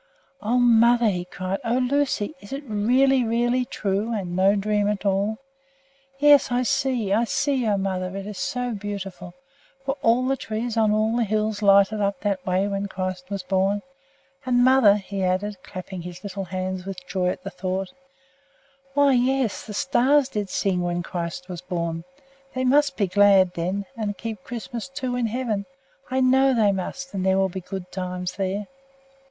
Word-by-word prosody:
"O 230 +4 +1
mother!" 235 -1 +5
he 180 -3 -2
cried. 185 +1 -4
"O 235 +2 +1
Lucy! 260 -2 0
Is 200 - -14
it 275 +2 -4
really, 250 +5 +3
really 240 +2 +1
true, 205 0 -2
and 190 -6 -3
no 190 +2 +4
dream 205 0 +1
at 210 -1 -3
all? 200 +3 +1 0.8
Yes, 290 -2 +5
I 245 +1 +2
see! 245 -5 0
I 230 +3 +3
see! 265 0 0
O 205 -2 +2
mother, 190 -1 -2
it 195 - -5
is 205 -2 -7
so 250 0 -2
beautiful! 195 -4 -6 0.5
Were 270 - 0
all 235 +3 +3
the 270 +1 +1
trees 225 -1 -4
on 220 -2 +3
all 215 +2 +1
the 240 - +2
hills 215 0 -1
lighted 200 +1 +4
up 200 0 -1
that 200 -3 -1
way 185 +2 +1
when 200 0 -2
Christ 185 -1 -5
was 200 -2 -4
born? 195 +2 0 0.6
And, 245 -2 +3
mother," 255 -5 +6
he 200 -1 -4
added, 190 +3 -1
clapping 185 0 -7
his 180 +1 -9
little 195 -1 -5
hands 185 +1 -4
with 185 -1 -7
joy 180 -1 -1
at 180 - -2
the - - -6
thought, 190 +3 -3 1.0
"why, 285 -1 +5
yes, 255 -2 +1
the 210 - -6
stars 270 +4 +3
did 205 -4 -3
sing 185 -2 0
when 175 0 -1
Christ 170 0 -5
was 180 -2 -6
born! 170 -2 -3 0.5
They 255 - -1
must 275 +1 +3
be 205 - +2
glad, 190 -1 +5
then, 185 +4 -2
and 210 -3 -3
keep 220 -5 -6
Christmas, 240 0 -6
too, 260 -2 -3
in 245 -2 0
heaven. 220 -3 -2 0.4
I 260 0 +1
know 265 +1 +4
they 215 -3 +4
must, 270 +8 -5
and 190 -2 -2
there 190 0 +3
will 195 0 +2
be 185 +1 -6
good 180 0 -7
times 180 -1 -4
there." 195 +1 -2
205 Hz, 180 wpm, -24 LUFS, 190-240 Hz, 1.0 s, mother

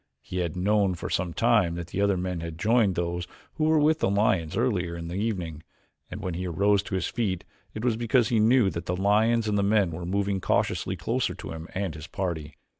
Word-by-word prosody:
He 90 - -6
had 85 -3 -2
known 100 0 +2
for 85 - -6
some 90 -1 0
time 85 0 +2
that 85 0 -7
other 100 0 +2
men 90 -1 -2
had 80 -1 -6
joined 110 0 +3
those 85 0 -2 0.3
who 155 - 0
were 160 0 +4
with 155 +1 +3
the - - +1
lions 100 -5 +1
earlier 95 -8 0
in 85 0 -6
the - - -5
evening, 90 -6 -3 0.5
and 105 - -7
when 90 -3 -2
he 90 +2 -3
arose 100 +4 +2
to 100 0 -5
his 95 - 0
feet 100 -8 -2 0.3
it 110 +3 -4
was 115 -3 +2
because 120 +1 +2
he 115 -3 +2
knew 110 -2 +4
that 85 +2 -6
the 90 - 0
lions 110 +4 +3
and 105 -1 +1
the - - +2
men 100 -3 +3
were 85 +2 -6
moving 100 0 0
cautiously - - 0
closer - - -1
to - - -8
him 80 0 -7
and 95 -3 -2
his 75 +1 -9
party. 80 -6 -4
95 Hz, 225 wpm, -27 LUFS, 85-105 Hz, 0.5 s, were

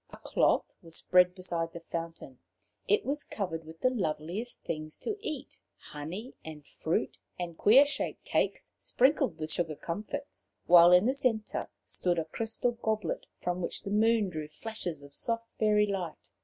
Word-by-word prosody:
A - - -11
cloth - - +1
was 165 -1 -9
spread 180 0 +4
beside 170 -3 -3
the 170 - -6
fountain. 165 -5 -6 0.5
It 205 - +3
was 285 +3 -1
covered 165 -6 -4
with 160 +1 -12
the 255 - +4
loveliest 185 +2 -3
things 155 -1 -4
to 430 - -2
eat 305 -9 -5 0.2
honey 175 - -7
and 155 -2 -9
fruit, 160 - -2 0.2
and 175 -2 -4
queer 250 - +7
shaped 285 - -3
cakes - - 0
sprinkled 260 - +2
with 155 -1 -4
sugar 160 -1 0
comfits 215 - -5 0.2
while 175 0 +8
in 180 +3 +7
the 255 - +3
centre 230 -6 -1 0.2
stood 175 -1 0
a 165 - 0
crystal 225 +8 0
goblet, 220 -6 -2
from 180 +1 -1
which - - -3
the 200 - -4
moon 220 -1 +3
drew 155 -3 -5
flashes 175 -3 -5
of 140 0 -13
soft 230 +7 -1
fairy 210 -1 +4
light. 185 - -4
180 Hz, 165 wpm, -30 LUFS, 165-225 Hz, 0.5 s, while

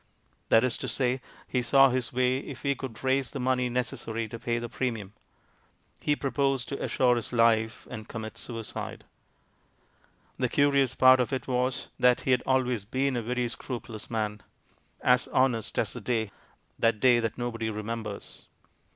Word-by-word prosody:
That 115 - +6
is 130 -2 0
to - - -4
say, 130 -1 0 0.3
he 125 - 0
saw 135 +2 +6
his 125 -1 -1
way 125 +1 +2
if 135 -2 -9
he 140 - +2
could 130 -4 -8
raise 130 -1 +2
the 140 - -6
money 125 -1 +1
necessary 115 -2 -2
to 115 - -7
pay 120 0 -1
the 120 0 -3
premium; 115 -5 -3 0.9
he 145 - +2
proposed 135 -2 0
to 140 - -4
assure 125 -2 +3
his 115 - -4
life 115 -2 +2
and 110 0 -8
commit 110 -1 -6
suicide. 115 -3 -6 1.4
The - - +1
curious 140 -2 +3
part 130 0 +7
of 125 -3 0
it 130 - -3
was, 125 0 -1
that 125 -1 +4
he 130 - 0
had 125 -1 +4
always 125 -5 +1
been 130 +5 0
a 120 - 0
very 125 +2 -1
scrupulous 115 -2 -6
man, 105 -2 -2 0.6
"as 125 0 +3
honest 125 -4 +1
as - - 0
the - - -7
day" 110 -4 -1 0.2
— - - -39
that 115 -2 +2
day 120 +1 +5
that 115 -2 -2
nobody 115 -2 -2
remembers. 105 -1 -6
125 Hz, 170 wpm, -28 LUFS, 115-130 Hz, 1.4 s, part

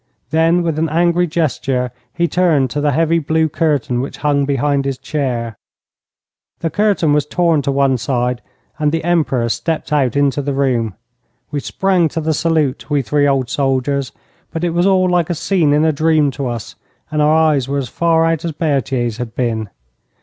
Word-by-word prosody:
Then, 165 +3 +3
with 160 -2 -1
an 160 0 0
angry 175 +2 +2
gesture, 135 -6 -1 0.2
he 170 0 0
turned 160 -8 +2
to 145 - -2
the 145 0 +2
heavy 165 +3 +2
blue 160 +1 +1
curtain 145 -6 0
which 135 - -6
hung 140 -1 +2
behind 140 0 0
his 135 -1 -2
chair. 125 -8 -3 1.0
The 165 - -1
curtain 200 -6 +2
was 150 -1 +1
torn 170 -2 +2
to 140 - -1
one 135 -2 +2
side 125 0 -1 0.4
and 150 -1 +1
the 165 0 -2
Emperor 155 -8 +1
stepped 160 +6 -2
out 135 -5 +1
into 140 -1 +1
the 140 0 -3
room. 120 -7 0 0.6
We 145 - -1
sprang 185 +3 +1
to 165 - -4
the 160 0 0
salute, 155 -4 0
we 145 -2 +1
three 145 +2 +1
old 135 -3 +1
soldiers, 135 0 0 0.4
but 165 - -5
it 175 - +1
was 175 +3 +2
all 185 -1 +3
like 175 -2 +1
a 175 - -1
scene 170 -2 +1
in 150 +2 +3
a 160 - +3
dream 155 -1 +2
to 135 -1 -4
us, 120 -3 -5 0.4
and 150 -1 0
our 150 +1 +4
eyes 155 -5 +2
were 140 +1 -1
as 135 -3 -2
far 165 +5 +2
out 165 -1 0
as 165 -2 -3
Berthier's 135 -7 -1
had 120 -3 -6
been. 115 -4 -2
150 Hz, 190 wpm, -17 LUFS, 135-165 Hz, 1.0 s, our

